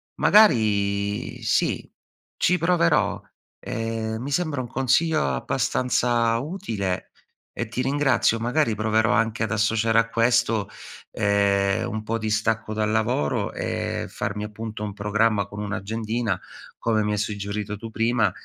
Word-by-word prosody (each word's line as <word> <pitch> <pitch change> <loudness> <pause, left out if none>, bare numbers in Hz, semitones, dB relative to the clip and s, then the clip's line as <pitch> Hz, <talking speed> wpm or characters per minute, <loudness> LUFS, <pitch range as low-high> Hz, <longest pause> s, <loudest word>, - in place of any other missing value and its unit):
Magari 105 - +3
sì, 110 - 0 0.5
ci 180 +1 +3
proverò. 170 - +2 0.4
Ehm, 115 0 -3
mi 140 +2 -5
sembra 155 -4 0
un 120 - -6
consiglio 135 +7 +2
abbastanza 115 - +1
utile 115 - -3 0.4
e 120 - -3
ti 125 +2 -2
ringrazio. 135 -4 +2
Magari 120 +1 +1
proverò 110 +1 +2
anche 115 +1 +1
ad 110 - -2
associare 110 +1 +2
a 115 0 +1
questo, 115 -3 +2 0.4
ehm, 100 -1 +1
un 110 +1 -4
po' 115 +1 -1
di 110 - -2
stacco 110 0 0
dal 110 0 0
lavoro, 110 - 0
e - - -3
farmi, 105 +1 -4
appunto, 110 0 -6
un 105 - -4
programma 105 0 +1
con 105 +1 -7
un'agendina, 110 0 -2 0.4
come 110 -2 +1
mi 105 - -1
hai - - -1
suggerito 105 0 -3
tu 115 +2 -8
prima, 115 -2 +1
110 Hz, 135 wpm, -24 LUFS, 105-120 Hz, 0.5 s, Magari